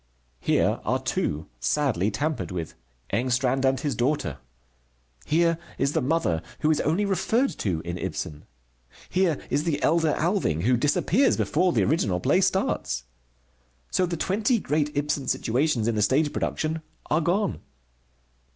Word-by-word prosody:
Here -, -, +2 dB
are -, -, +1 dB
two, 75 Hz, +1 st, -2 dB
sadly 100 Hz, -, +1 dB
tampered 145 Hz, +6 st, -2 dB
with: 85 Hz, -4 st, -5 dB, 0.4 s
Engstrand 130 Hz, +2 st, +1 dB
and 130 Hz, 0 st, +2 dB
his 145 Hz, -2 st, -1 dB
daughter. 120 Hz, -, -1 dB, 0.9 s
Here 165 Hz, +1 st, +2 dB, 0.2 s
is 140 Hz, +2 st, +1 dB
the -, -, +1 dB
mother, 125 Hz, -, +1 dB, 0.2 s
who 155 Hz, -, +3 dB
is 155 Hz, -, +2 dB
only 170 Hz, +7 st, +1 dB
referred 200 Hz, +7 st, +1 dB
to 85 Hz, -6 st, -1 dB
in 85 Hz, +2 st, -5 dB
Ibsen. 80 Hz, -4 st, -5 dB, 0.7 s
Here 180 Hz, -5 st, +2 dB
is 145 Hz, -, +1 dB
the 155 Hz, -3 st, 0 dB
elder 160 Hz, -1 st, +3 dB
Alving, 165 Hz, -, +1 dB
who 125 Hz, +4 st, +4 dB
disappears 150 Hz, -, +2 dB
before 180 Hz, +4 st, +2 dB
the -, -, +2 dB
original 100 Hz, -, +1 dB
play -, -, +3 dB
starts. 65 Hz, +1 st, 0 dB, 0.9 s
So 185 Hz, -, +2 dB
the 170 Hz, -1 st, -3 dB
twenty 210 Hz, -, +1 dB
great 150 Hz, -6 st, 0 dB
Ibsen 145 Hz, -2 st, -1 dB
situations 125 Hz, -1 st, +1 dB
in 115 Hz, -, +2 dB
the 105 Hz, -, 0 dB
stage 145 Hz, +7 st, +2 dB
production 160 Hz, +1 st, -2 dB, 0.3 s
are 155 Hz, -, +3 dB
gone. 185 Hz, +5 st, 0 dB
145 Hz, 145 wpm, -26 LUFS, 110-165 Hz, 0.9 s, who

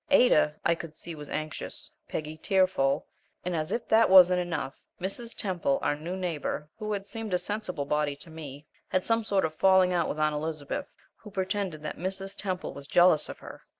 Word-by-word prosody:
Ada, 245 Hz, -, +5 dB
I 170 Hz, -, +5 dB
could 165 Hz, -2 st, -7 dB
see, 170 Hz, -, -7 dB
was 150 Hz, -2 st, -9 dB
anxious; 155 Hz, -1 st, -5 dB, 0.2 s
Peggy, 155 Hz, 0 st, -4 dB
tearful; 185 Hz, -6 st, +2 dB, 0.4 s
and, 180 Hz, -1 st, -1 dB
as 155 Hz, -1 st, -2 dB
if 235 Hz, -, -2 dB
this 225 Hz, +1 st, +5 dB
wasn't 180 Hz, -1 st, +8 dB
enough, 165 Hz, -6 st, -3 dB, 0.2 s
Mrs. 215 Hz, +6 st, -4 dB
Temple, 180 Hz, -8 st, 0 dB
our -, -, +2 dB
new 165 Hz, +5 st, -5 dB
neighbor, 160 Hz, -4 st, -3 dB
who 215 Hz, -1 st, -3 dB
had 200 Hz, -1 st, -2 dB
seemed 220 Hz, -2 st, -3 dB
a -, -, +4 dB
sensible 180 Hz, -7 st, -3 dB
body 150 Hz, 0 st, 0 dB
to 165 Hz, +3 st, -10 dB
me, 150 Hz, -2 st, -9 dB, 0.2 s
had 185 Hz, -, +1 dB
some 225 Hz, 0 st, +2 dB
sort 200 Hz, -4 st, +2 dB
of 155 Hz, -, -3 dB
a -, -, -30 dB
falling 190 Hz, -1 st, +5 dB
out 170 Hz, -2 st, +1 dB
with -, -, -3 dB
Aunt 155 Hz, 0 st, +2 dB
Elizabeth, 150 Hz, -1 st, -4 dB, 0.2 s
who 215 Hz, -, -12 dB
pretended 190 Hz, -4 st, -2 dB
that 155 Hz, -, -4 dB
Mrs. 195 Hz, +2 st, -3 dB
Temple 185 Hz, -2 st, -3 dB
was 140 Hz, 0 st, -9 dB
jealous 175 Hz, -1 st, +5 dB
of -, -, -6 dB
her! -, -, -11 dB
175 Hz, 200 wpm, -28 LUFS, 155-195 Hz, 0.4 s, wasn't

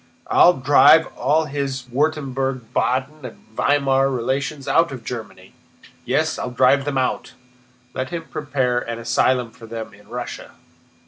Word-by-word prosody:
"I'll 175 Hz, -, +6 dB
drive 145 Hz, +3 st, +5 dB
all 150 Hz, +5 st, +1 dB
his 140 Hz, -3 st, -3 dB
Württemberg, 135 Hz, -1 st, -1 dB
Baden, 130 Hz, +4 st, -1 dB
and 125 Hz, -, -8 dB, 0.2 s
Weimar 135 Hz, -1 st, +2 dB
relations 135 Hz, +3 st, -2 dB
out 165 Hz, +4 st, +3 dB
of 130 Hz, -3 st, -8 dB
Germany.... 110 Hz, -6 st, -8 dB, 0.5 s
Yes. 150 Hz, +5 st, 0 dB
I'll -, -, -3 dB
drive 130 Hz, +3 st, +3 dB
them 145 Hz, -2 st, -2 dB
out. 130 Hz, -, -2 dB, 0.6 s
Let 130 Hz, 0 st, -3 dB
him 170 Hz, -1 st, -5 dB
prepare 130 Hz, -6 st, -1 dB
an 115 Hz, -1 st, -5 dB
asylum 120 Hz, +1 st, +1 dB
for 115 Hz, -1 st, -14 dB
them 115 Hz, -1 st, -7 dB
in 105 Hz, 0 st, -19 dB
Russia!" 120 Hz, +2 st, -7 dB
130 Hz, 140 wpm, -21 LUFS, 125-145 Hz, 0.6 s, I'll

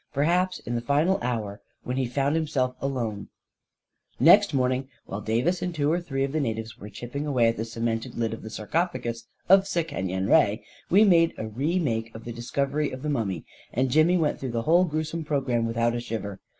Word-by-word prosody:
Perhaps, 175 Hz, +6 st, +1 dB
in 120 Hz, -, -5 dB
the 120 Hz, -, -1 dB
final 150 Hz, +9 st, +2 dB
hour, 110 Hz, -5 st, -3 dB, 0.2 s
when 125 Hz, -, -3 dB
he 130 Hz, -1 st, 0 dB
found 140 Hz, +4 st, 0 dB
himself 135 Hz, -5 st, 0 dB
alone... 115 Hz, -7 st, -3 dB, 0.9 s
Next -, -, +7 dB
morning, 130 Hz, 0 st, 0 dB, 0.2 s
while 100 Hz, -, -5 dB
Davis 120 Hz, -, 0 dB
and 180 Hz, -1 st, -3 dB
two 145 Hz, 0 st, +1 dB
or 175 Hz, +2 st, +1 dB
three 135 Hz, -5 st, -2 dB
of 135 Hz, -, -1 dB
the 155 Hz, -, 0 dB
natives 110 Hz, -4 st, -3 dB
were 105 Hz, -, -9 dB
chipping 120 Hz, +8 st, -5 dB
away 125 Hz, -5 st, +3 dB
at 115 Hz, -, -1 dB
the 110 Hz, -, -2 dB
cemented 115 Hz, 0 st, -3 dB
lid 115 Hz, -1 st, -1 dB
of 115 Hz, -, -7 dB
the 110 Hz, -, -8 dB
sarcophagus 115 Hz, -, -2 dB, 0.2 s
of 195 Hz, +1 st, +6 dB
Sekenyen 95 Hz, -, -2 dB
Re, 105 Hz, +1 st, +4 dB, 0.3 s
we 200 Hz, +4 st, +6 dB
made 170 Hz, -5 st, +4 dB
a -, -, -4 dB
re 140 Hz, -, -1 dB
take 115 Hz, -9 st, -1 dB
of 110 Hz, -, -8 dB
the 120 Hz, -, -6 dB
discovery 140 Hz, +5 st, -1 dB
of 130 Hz, +1 st, -8 dB
the 150 Hz, -, -1 dB
mummy, 100 Hz, -, -2 dB, 0.3 s
and 130 Hz, +1 st, 0 dB
Jimmy 155 Hz, +5 st, +4 dB
went 155 Hz, -3 st, 0 dB
through 130 Hz, -3 st, -4 dB
the 115 Hz, -1 st, -1 dB
whole 175 Hz, +6 st, +4 dB
gruesome 155 Hz, 0 st, -3 dB
programme 130 Hz, -6 st, 0 dB
with 115 Hz, 0 st, -4 dB
out 115 Hz, 0 st, +2 dB
a 120 Hz, -, -2 dB
shiver. 110 Hz, -4 st, -5 dB
130 Hz, 205 wpm, -26 LUFS, 115-155 Hz, 0.9 s, Next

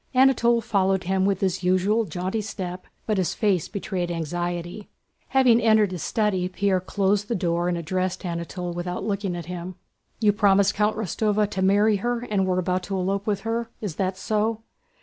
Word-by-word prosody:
Anatole 240 Hz, -3 st, +4 dB
followed 195 Hz, -4 st, +1 dB
him 190 Hz, +1 st, +1 dB
with 195 Hz, -2 st, 0 dB
his 190 Hz, -1 st, 0 dB
usual 185 Hz, +5 st, +2 dB
jaunty 185 Hz, +5 st, -3 dB
step 185 Hz, -3 st, -6 dB, 0.2 s
but 215 Hz, -3 st, 0 dB
his 180 Hz, -, 0 dB
face 195 Hz, -7 st, +1 dB
betrayed 185 Hz, -3 st, -3 dB
anxiety. 175 Hz, +3 st, -4 dB, 0.4 s
Having 255 Hz, -3 st, +4 dB
entered 215 Hz, -3 st, +4 dB
his 180 Hz, -3 st, -5 dB
study 195 Hz, -5 st, 0 dB
Pierre 190 Hz, 0 st, +1 dB
closed 200 Hz, +2 st, 0 dB
the 235 Hz, -, -1 dB
door 175 Hz, -1 st, 0 dB
and 175 Hz, -, -1 dB
addressed 185 Hz, +3 st, -2 dB
Anatole 170 Hz, 0 st, -4 dB
without 180 Hz, +1 st, -4 dB
looking 200 Hz, -3 st, -2 dB
at 170 Hz, -2 st, -6 dB
him. 180 Hz, +1 st, -6 dB, 0.4 s
"You 210 Hz, -2 st, +4 dB
promised 200 Hz, -1 st, +4 dB
Countess 210 Hz, -2 st, -1 dB
Rostóva 210 Hz, -1 st, +2 dB
to 190 Hz, -, -2 dB
marry 205 Hz, +2 st, +4 dB
her 240 Hz, +3 st, -1 dB
and 195 Hz, -2 st, +1 dB
were 185 Hz, -1 st, +1 dB
about 185 Hz, 0 st, 0 dB
to 195 Hz, -, -1 dB
elope 195 Hz, +2 st, -1 dB
with 200 Hz, -2 st, 0 dB
her, 230 Hz, +1 st, -2 dB
is 195 Hz, -8 st, -5 dB
that 185 Hz, -1 st, -1 dB
so?" 220 Hz, +2 st, -1 dB
195 Hz, 180 wpm, -24 LUFS, 180-210 Hz, 0.4 s, Anatole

